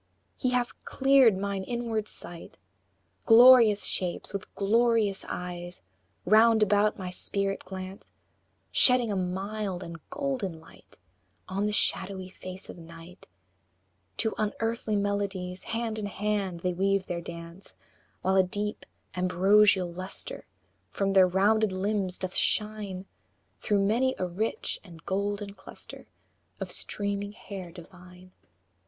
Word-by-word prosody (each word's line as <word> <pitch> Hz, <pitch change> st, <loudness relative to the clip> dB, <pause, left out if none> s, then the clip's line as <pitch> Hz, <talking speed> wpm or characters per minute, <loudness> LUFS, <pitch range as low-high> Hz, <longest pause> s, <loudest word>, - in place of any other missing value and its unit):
He 255 Hz, -, -1 dB
hath 250 Hz, -1 st, 0 dB
cleared 265 Hz, -6 st, +4 dB
mine 200 Hz, 0 st, -3 dB
inward 230 Hz, -1 st, -2 dB
sight; 175 Hz, -4 st, -11 dB, 0.7 s
Glorious 230 Hz, -3 st, +8 dB
shapes 180 Hz, +1 st, -2 dB
with 200 Hz, -, -6 dB
glorious 220 Hz, -1 st, +2 dB
eyes 175 Hz, -, -6 dB, 0.4 s
Round 220 Hz, +2 st, +5 dB
about 210 Hz, +1 st, +2 dB
my 185 Hz, -2 st, -5 dB
spirit 195 Hz, +1 st, -2 dB
glance, 185 Hz, +1 st, -8 dB, 0.6 s
Shedding 250 Hz, -3 st, +5 dB
a -, -, -1 dB
mild 190 Hz, +1 st, -3 dB
and 170 Hz, 0 st, -8 dB
golden 255 Hz, -, -3 dB
light 160 Hz, -, -19 dB, 0.5 s
On 195 Hz, +2 st, -1 dB
the -, -, -1 dB
shadowy 190 Hz, -2 st, +1 dB
face 185 Hz, 0 st, -9 dB
of -, -, -10 dB
Night; 165 Hz, +2 st, -13 dB, 0.9 s
To 220 Hz, -, 0 dB
unearthly 225 Hz, +1 st, -1 dB
melodies, 200 Hz, -3 st, -2 dB
Hand 225 Hz, -1 st, -3 dB
in 205 Hz, -, -3 dB
hand, 200 Hz, -3 st, -2 dB
they 180 Hz, 0 st, 0 dB
weave 195 Hz, +1 st, +1 dB
their 175 Hz, -2 st, -4 dB
dance, 170 Hz, +2 st, -10 dB, 0.5 s
While 190 Hz, +1 st, +2 dB
a -, -, +8 dB
deep, 205 Hz, +3 st, -4 dB, 0.3 s
ambrosial 185 Hz, +1 st, +4 dB
lustre 185 Hz, +2 st, -7 dB, 0.4 s
From 195 Hz, -1 st, -1 dB
their 190 Hz, -1 st, +7 dB
rounded 205 Hz, +3 st, +2 dB
limbs 190 Hz, -1 st, -1 dB
doth 185 Hz, 0 st, -4 dB
shine, 210 Hz, -3 st, 0 dB, 0.5 s
Through 200 Hz, -2 st, +1 dB
many 255 Hz, +6 st, +2 dB
a 185 Hz, -, -1 dB
rich 185 Hz, +6 st, -2 dB
and 170 Hz, -4 st, -14 dB
golden 200 Hz, +1 st, -2 dB
cluster 190 Hz, -1 st, -11 dB, 0.5 s
Of -, -, -5 dB
streaming 200 Hz, 0 st, -3 dB
hair 195 Hz, -5 st, -8 dB
divine. 180 Hz, +1 st, -14 dB
195 Hz, 125 wpm, -28 LUFS, 185-215 Hz, 0.9 s, Glorious